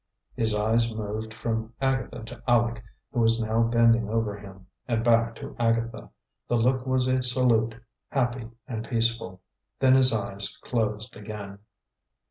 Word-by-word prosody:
His 110 -2 +3
eyes 115 +2 +2
moved 110 0 -5
from 115 0 -3
Agatha 135 -4 -1
to 115 +1 -10
Aleck, 120 -1 +2 0.3
who 120 - -2
was 115 0 +3
now 110 0 +1
bending 115 -1 +3
over 110 -2 -1
him, 95 -2 -12 0.2
and 115 -2 0
back 115 -1 +3
to - - -9
Agatha. 115 - -1 0.4
The 120 - +1
look 125 +2 +1
was 130 -1 +1
a 130 0 +2
salute, 120 -3 +2 0.3
happy 120 -3 -1 0.2
and 115 -4 -4
peaceful. 115 -6 0 0.4
Then 130 -1 +5
his 130 -1 +5
eyes 100 -1 +1
closed 110 -1 -2
again. 100 -1 -8
115 Hz, 145 wpm, -26 LUFS, 110-120 Hz, 0.4 s, Then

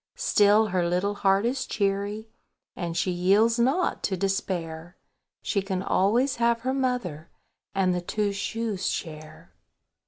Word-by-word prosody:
Still 215 - +4
her 180 -2 0
little 185 +4 0
heart 195 +1 +2
is 255 +3 -1
cheery, 200 +2 -2 0.5
And 170 -2 -4
she 185 - +1
yields 200 +7 +3
not 270 +10 +1
to 190 - -1
despair; 175 -3 -3 0.5
She 200 - 0
can 190 -1 -3
always 235 +9 +2
have 235 0 +2
her 260 +2 -1
mother, 245 - -2 0.5
And 185 -2 +2
the 180 - -2
Two 205 +3 -1
shoes 205 -1 -2
Chair. 155 -1 -7
200 Hz, 135 wpm, -26 LUFS, 180-230 Hz, 0.5 s, Still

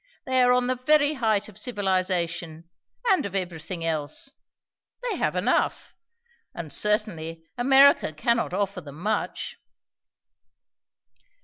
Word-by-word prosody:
They 260 0 +2
are 250 0 +5
on 250 0 +3
the 255 - +1
very 290 +3 +3
height 220 -6 0
of 215 -1 -11
civilization, 180 -6 -1 0.4
and 365 -6 +3
of 200 -4 -5
everything 170 -2 -3
else. 160 - -1 0.7
They - - -2
have - - 0
enough. - - 0 0.6
And 160 -4 -6
certainly, 170 -7 -1
America 270 - +5
cannot 230 +11 0
offer 195 0 -2
them 145 -1 -11
much." 210 +4 -3
200 Hz, 115 wpm, -25 LUFS, 165-250 Hz, 0.7 s, are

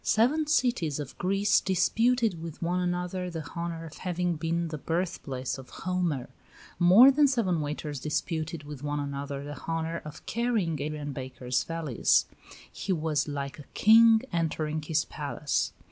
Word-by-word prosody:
Seven 285 +8 +2
cities 235 - +1
of 145 -3 -6
Greece 195 +2 +2
disputed 220 +1 +2
with 165 -2 -7
one 175 +2 0
another 180 +1 -2
the 160 -4 -6
honor 170 -1 -4
of 155 - -10
having 180 -1 -1
been 165 +2 -1
the 155 -1 -5
birthplace 150 -7 -3
of 130 - -11
Homer; 175 -8 -2 0.5
more 195 +10 +8
than 290 +1 +4
seven 205 - +1
waiters 150 -1 -4
disputed 155 +2 -3
with 145 -2 -8
one 145 0 -2
another 140 0 -4
the 145 -2 -8
honor 165 0 -2
of 150 -1 -10
carrying 215 - 0
Adrian 150 -1 -4
Baker's 130 -2 -2
valise. 165 -7 +1 0.5
He 195 - -4
was 155 -3 0
like 140 0 -4
a - - -8
king 225 +1 +7
entering 155 -2 -1
his 155 0 0
palace. 145 0 -2
165 Hz, 150 wpm, -28 LUFS, 150-185 Hz, 0.5 s, more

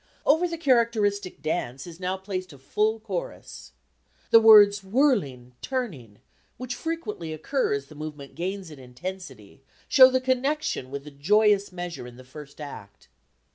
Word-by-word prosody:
Over 320 +5 +3
the 335 -1 -5
characteristic 230 - +1
dance 135 -5 -3
is 170 -1 -11
now 185 +1 -2
placed 185 -1 -5
a - - -13
full 215 +11 -1
chorus. 195 -5 -7 0.6
The 230 - +9
words 210 -2 +7
"whirling, 190 - 0
turning," 165 - -5 0.4
which 250 -1 -5
frequently 330 - -5
occur 205 - -1
as 140 0 -5
the 145 - -15
movement 150 -2 -8
gains 185 0 -5
in 150 - -12
intensity, 135 - -9 0.3
show 260 -2 +8
the 260 0 +1
connection 260 - -1
with 140 +1 -6
the 150 - -11
joyous 205 +7 +2
measure 175 -7 -6
in 120 - -12
the 130 - -12
first 140 +3 -13
act. 140 -9 -10
185 Hz, 150 wpm, -25 LUFS, 140-230 Hz, 0.6 s, The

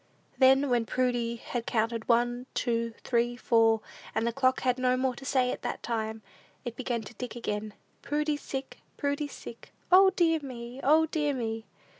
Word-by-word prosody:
Then, 265 +1 +5
when 235 -2 +2
Prudy 245 -2 0
had 235 0 -5
counted 230 0 -1
one, 240 +1 +2
two, 230 -2 0
three, 240 0 +1
four, 225 -2 +3 0.3
and 225 - +1
the 235 - 0
clock 260 0 +2
had 255 0 +1
no 255 0 +2
more 260 0 +1
to 270 - -10
say 255 -2 +2
at - - -5
that - - -4
time, 220 -2 -3 0.4
it 240 -1 -4
began 240 -3 -2
to 215 - -10
tick 245 +2 -6
again: 210 -2 -4 0.3
"Prudy's 295 0 -1
sick! 270 0 -6 0.2
Prudy's 285 0 -2
sick! 235 - -10 0.2
O, 380 +1 +8
dear 335 -4 +2
me! 250 -3 -8
O, 310 +3 +5
dear 295 -2 0
me!" 225 -2 -3
245 Hz, 175 wpm, -29 LUFS, 230-270 Hz, 0.4 s, O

